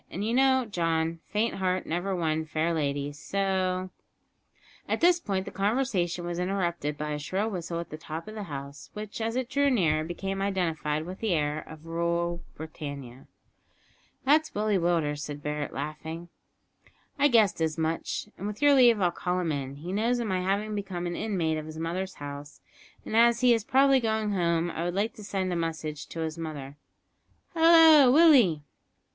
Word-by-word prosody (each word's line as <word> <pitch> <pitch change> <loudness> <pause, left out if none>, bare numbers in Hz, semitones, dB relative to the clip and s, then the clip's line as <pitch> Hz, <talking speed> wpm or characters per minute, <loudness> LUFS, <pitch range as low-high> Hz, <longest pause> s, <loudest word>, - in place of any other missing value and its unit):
And 195 +4 -4
you 225 - 0
know, 260 0 +4
John, 165 -4 -1
`faint 220 +3 +1
heart 185 -1 -1
never 175 +4 -2
won 160 -2 0
fair 160 +2 -1
lady,' 145 -2 -1
so 185 +3 -1 0.5
" - - -30
At - - 0
this 350 +1 +5
point 195 - -2
the - - -7
conversation 195 -5 0
was 175 0 -3
interrupted 175 -5 -1
by 150 0 -3
a 150 - -2
shrill 195 +9 -2
whistle 170 -2 -4
at 170 - -7
the 155 - -7
top 160 +1 -7
of 215 - -7
the 215 - -6
house, 140 0 -8
which, 210 +1 -6
as 225 +1 -1
it 255 -1 -1
drew 280 +1 +2
nearer, 160 - +2
became 195 +4 -4
identified 165 -6 -1
with 185 +2 -8
the 220 -5 0
air 150 0 -1
of 160 0 -12
"Rule 170 +1 -1
Britannia!" 140 -5 -8 1.0
"That's 310 +3 +3
Willie 210 -1 +1
Willders," 165 -4 0
said 145 -1 -6
Barret, 150 -1 -3
laughing. 160 +4 -6 0.9
"I 290 - +6
guessed 220 - +3
as 160 0 0
much, 160 +5 -2
and 200 - -4
with 210 0 -5
your 290 0 +5
leave 240 -5 +6
I'll 180 -3 +2
call 180 +1 -2
him 170 -3 -1
in. 140 -2 -4
He 170 +6 -6
knows 230 +4 +1
of 240 - -2
my 185 -3 -1
having 200 +3 -1
become 195 -4 -4
an 175 0 -3
inmate 170 -7 -1
of 155 - -8
his 155 0 -8
mother's 180 +4 -3
house, 145 0 -8 0.5
and - - -4
as 235 +1 +5
he 250 -1 +6
is 225 -3 0
probably 270 +3 +4
going 220 -2 0
home 170 -2 +1
I 165 - -4
would 175 +1 -2
like 215 +3 0
to 210 - -11
send 190 -2 -2
a - - -1
message 160 -3 -4
to 165 - -6
his 160 0 -4
mother. 145 -4 -6 0.8
Hallo, 325 -5 +7
Willie." 255 - +6
175 Hz, 185 wpm, -28 LUFS, 160-215 Hz, 1.0 s, Hallo